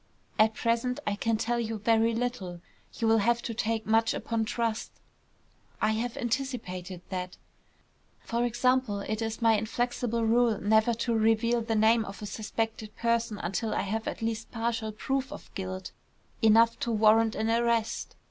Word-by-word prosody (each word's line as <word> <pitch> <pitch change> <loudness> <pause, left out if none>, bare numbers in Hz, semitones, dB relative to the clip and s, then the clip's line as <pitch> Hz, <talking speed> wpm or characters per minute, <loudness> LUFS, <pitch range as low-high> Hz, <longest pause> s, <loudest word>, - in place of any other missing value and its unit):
At 215 0 +4
present 235 +2 0
I 205 - 0
can 225 +2 0
tell 235 +2 0
you 225 -1 -2
very 225 +2 +2
little. 225 -8 -3 0.4
You 230 - 0
will 225 0 +5
have 235 +3 +2
to 230 - -3
take 220 0 -1
much 225 +1 +2
upon 225 -1 -1
trust." 230 -1 -2 0.9
"I 215 - +2
have 230 +2 -2
anticipated 225 -8 -3
that." 180 -1 -4 0.8
"For 235 +1 -1
example, 245 -3 +1
it 215 +2 -3
is 225 +1 -3
my 225 -1 +5
inflexible 235 +1 -1
rule 230 -1 +3
never 220 +3 +3
to 235 - +1
reveal 225 +1 +2
the 225 0 -1
name 220 +1 +4
of 195 0 -8
a - - -3
suspected 220 +1 -4
person 230 -2 0
until 205 +5 -2
I - - +1
have 220 +3 -3
at - - -4
least 225 0 -2
partial 225 -2 -2
proof 270 +5 -2
of - - -10
guilt, 185 -1 -5 0.5
enough 230 +1 +5
to 235 - -1
warrant 220 0 +4
an 220 +1 0
arrest. 230 -1 0
225 Hz, 165 wpm, -28 LUFS, 215-235 Hz, 0.9 s, will